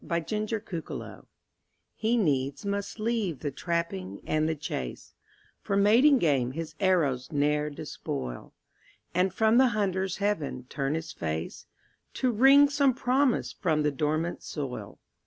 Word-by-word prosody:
THE 170 - -2
INDIAN 215 +6 -2
CORN 180 -7 -5
PLANTER - - -8 0.7
He 225 +2 0
needs 140 - 0
must 200 +2 -3
leave 215 - -1
the 145 - -2
trapping 135 - -3
and 155 0 +1
the 160 - 0
chase, 65 - -6 0.5
For 200 - -1
mating 235 +8 +6
game 135 - +1
his 165 +1 -5
arrows 155 -10 +1
ne'er 150 0 +1
despoil, 65 - -6 0.6
And 180 +2 +2
from 220 +4 +3
the 260 - +6
hunter's 190 -2 0
heaven 195 -11 -2
turn 140 +1 -1
his 160 0 -4
face, 80 - -5 0.5
To 255 -2 +1
wring 270 +5 +7
some 280 -3 +2
promise 260 0 +1
from 155 -5 0
the 150 - +2
dormant 155 +4 -1
soil. 140 -5 -6
170 Hz, 140 wpm, -28 LUFS, 145-215 Hz, 0.7 s, wring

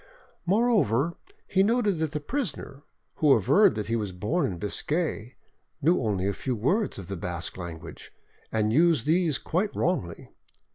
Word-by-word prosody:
Moreover, 185 - +2 0.3
he 190 - +2
noted 210 -4 +2
that 160 -2 -1
the 150 - -2
prisoner, 150 - -4 0.4
who 150 -3 +5
averred 115 - +4
that 105 -1 -3
he 115 - 0
was 105 -4 -2
born 105 - -1
in 90 - -5
Biscay, 125 - -2 0.4
knew 165 +4 +2
only 100 -5 -1
a 100 - 0
few 130 +5 -3
words 180 - 0
of 95 -3 -8
the 100 - -4
Basque 85 0 -4
language, 85 -3 -9 0.4
and 110 0 +1
used 160 -3 +3
these 160 -2 +2
quite 190 +8 -2
wrongly. 120 - -2
140 Hz, 155 wpm, -27 LUFS, -, 0.4 s, who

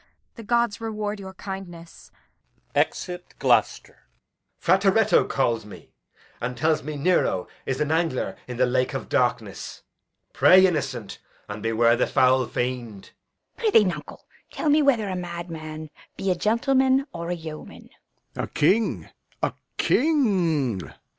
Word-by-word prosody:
The 230 - -10
gods 235 -1 0
reward 215 -2 -3
your 190 -1 -9
kindness! 175 -4 -9 0.6
Exit 180 -1 -2
[Gloucester]. - - +1
Edg. - - -44
Frateretto 195 +4 +3
calls 120 -4 0
me, 105 - -13 0.5
and 125 +1 -3
tells 155 0 +1
me 150 +1 -6
Nero 145 - +1 0.2
is 135 -1 -1
an 150 0 0
angler 160 -5 0
in 125 -1 -6
the 130 - +4
lake 125 +1 0
of - - -5
darkness. - - -1 0.5
Pray, 185 +1 +7
innocent, 140 - -2 0.3
and 105 0 -7
beware 115 +1 +3
the 120 - +1
foul 130 0 +3
fiend. 120 -5 -4 0.5
Fool. 455 - +2
Prithee, 220 - +6
nuncle, 155 -6 -5 0.2
tell 310 - -2
me 305 +1 +5
whether 245 -7 +2
a 185 - -3
madman 165 -3 -6 0.3
be 195 - 0
a - - +1
gentleman 260 +7 +2
or 170 0 -5
a 175 - -1
yeoman. 160 -2 -10 0.4
Lear. - - -2
A - - -13
king, 210 +9 +1 0.4
a - - +1 0.2
king! 180 - +2
170 Hz, 140 wpm, -24 LUFS, 130-205 Hz, 0.6 s, Pray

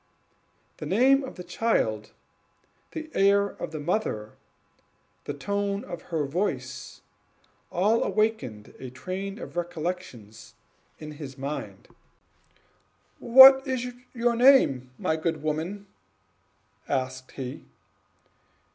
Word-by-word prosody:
The 155 - -6
name 265 - +4
of 265 - -8
the 180 - -8
child, 175 - -1 0.8
the 315 -1 -7
air 200 +1 +3
of - - -7
the 155 -1 -6
mother, 145 - -2 0.9
the 145 - -3
tone 200 +5 -2
of 175 -2 -7
her 160 -4 -1
voice, 140 -5 -4 0.7
all 210 +6 +2
awakened 215 - -1
a 130 - -7
train 190 - -6
of 245 - -9
recollections 170 - -5 0.4
in 155 0 -8
his 145 -3 -9
mind. 135 -8 -6 1.3
"What 265 +2 +9
is 250 -1 -2 0.3
your 235 0 +1
name, 230 - +5
my 160 - 0
good 160 -2 -2
woman?" 165 +7 -3 1.0
asked 130 -1 -3
he. 130 +1 -7
175 Hz, 105 wpm, -26 LUFS, 135-215 Hz, 1.3 s, What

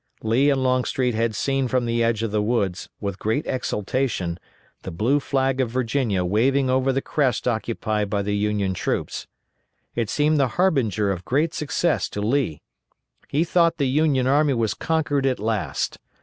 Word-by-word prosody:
Lee 120 +6 +3
and 135 -2 +1
Longstreet 130 -1 +1
had 115 0 0
seen 135 +3 0
from 125 0 0
the 115 0 +1
edge 115 -1 +1
of 115 - -2
the 105 0 +1
woods, 105 -5 -1
with 100 -2 -4
great 110 +8 -1
exultation, 105 -7 -2 0.4
the - - -6
blue 110 - +1
flag 135 -1 0
of 125 - 0
Virginia 115 -5 0
waving 130 +7 +2
over 130 +1 +2
the 135 +1 -1
crest 130 -6 0
occupied 110 -3 -1
by 100 -1 0
the 105 +1 -1
Union 105 -2 0
troops. - - -3 0.7
It 115 -3 -2
seemed 150 +3 +2
the 135 - +3
harbinger 115 - +2
of 95 -2 -4
great 155 +5 0
success 155 +3 0
to - - -5
Lee. 110 - 0 0.6
He 150 +4 +1
thought 170 -1 +2
the 140 - +1
Union 140 -1 +2
army 140 +1 +3
was 110 -3 0
conquered 150 -4 0
at 130 - +1
last. 110 -1 -2
125 Hz, 170 wpm, -23 LUFS, 105-135 Hz, 0.7 s, Lee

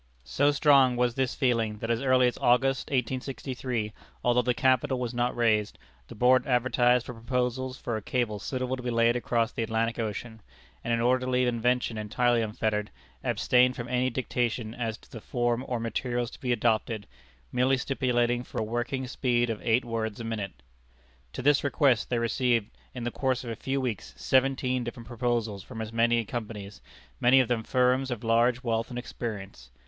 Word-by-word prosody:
So 145 - +2
strong 140 -3 +5
was 120 -1 +1
this 130 -1 -1
feeling, 115 -5 +1
that 115 +2 -3
as 115 - 0
early 130 -1 +4
as 120 - -1
August, 130 +2 +2
1863, 125 -3 -3 0.3
although 120 0 +3
the 125 0 0
capital 130 +1 +2
was 125 -1 -3
not 120 +1 0
raised, 110 -3 +1 0.3
the - - -10
Board 125 +5 +4
advertised 125 -1 +3
for 125 - -6
proposals 125 +2 -2
for 120 - -3
a 110 - -3
cable 110 -2 -1
suitable 130 +4 -2
to 130 - -8
be 125 - -3
laid 115 0 +3
across 120 -1 0
the - - -4
Atlantic 115 +1 -1
Ocean; 110 0 -4 0.4
and 120 - -2
in 115 0 +1
order 125 +1 +2
to - - -1
leave 125 0 +2
invention 120 -1 0
entirely 120 +3 +1
unfettered, 105 -1 -1 0.3
abstained 125 0 +3
from 120 - -5
any 125 +1 +1
dictation 120 -3 -2
as 115 -2 -3
to - - -22
the 115 - -8
form 120 +1 -1
or 125 -2 -2
materials 120 +1 -2
to - - -12
be 125 - -1
adopted, 110 -3 0 0.5
merely 130 +2 +2
stipulating 120 -2 0
for - - -10
a - - 0
working 120 +4 -2
speed 120 -2 0
of 110 - -5
eight 120 +2 +2
words 110 -2 -3
a - - -5
minute. 105 - -5 0.7
To 130 - -5
this 145 0 +4
request 140 -4 +2
they 120 - +1
received, 115 -1 +1 0.2
in 125 - -5
the 120 - -2
course 130 -1 -1
of 120 - -5
a - - -4
few 135 +4 -2
weeks, 110 - -4
seventeen 130 - +1
different 120 0 -7
proposals 115 -4 -2
from 115 +3 -9
as 110 0 -5
many 115 0 +2
companies, 105 -5 -6 0.4
many 125 +2 +6
of 130 - +3
them 120 -2 0
firms 125 +3 +2
of 120 -3 -4
large 120 +2 +2
wealth 115 -1 -1
and 125 - -6
experience. 100 - -6
120 Hz, 185 wpm, -28 LUFS, 115-125 Hz, 0.7 s, many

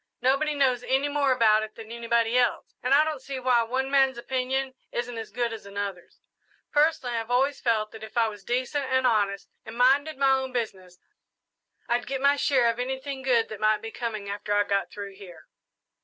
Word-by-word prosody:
Nobody 275 +4 +1
knows 260 -4 +2
any 265 +3 +1
more 285 -2 +1
about 220 -4 +4
it 215 0 -7
than 225 0 -10
anybody 235 0 0
else, 250 -1 +1
and 250 - -2
I 285 +2 +6
don't 310 -4 -3
see 270 0 -5
why 250 -2 +3
one 260 +4 -2
man's 270 -2 +3
opinion 260 +2 -2 0.2
isn't 240 0 -3
as 225 -1 -6
good 235 +1 -2
as 220 -3 -9
another's. 200 -3 -6 0.5
Personally, 295 -4 +2
I 230 - 0
have 225 +1 -7
always 265 +3 +1
felt 215 -3 +1
that 220 -1 -11
if 220 +2 -9
I 230 -1 +4
was 205 -2 -8
decent 255 +5 -1
and 260 0 +1
honest 205 -4 +1 0.2
and 225 +1 -9
minded 275 +4 +3
my 275 0 +3
own 265 -1 0
business, 190 -7 -4 0.9
I'd 240 +1 0
get 270 0 -2
my 280 +1 +4
share 265 -4 +2
of 230 - -9
anything 265 +2 -4
good 245 -4 +2
that 215 - -7
night 215 0 +2
be 225 - -6
coming 215 -4 -4
after 205 +1 -2
I 205 - +4
got 200 -1 -1
through 200 -1 -8
here. 190 -4 -13
245 Hz, 205 wpm, -26 LUFS, 220-265 Hz, 0.9 s, I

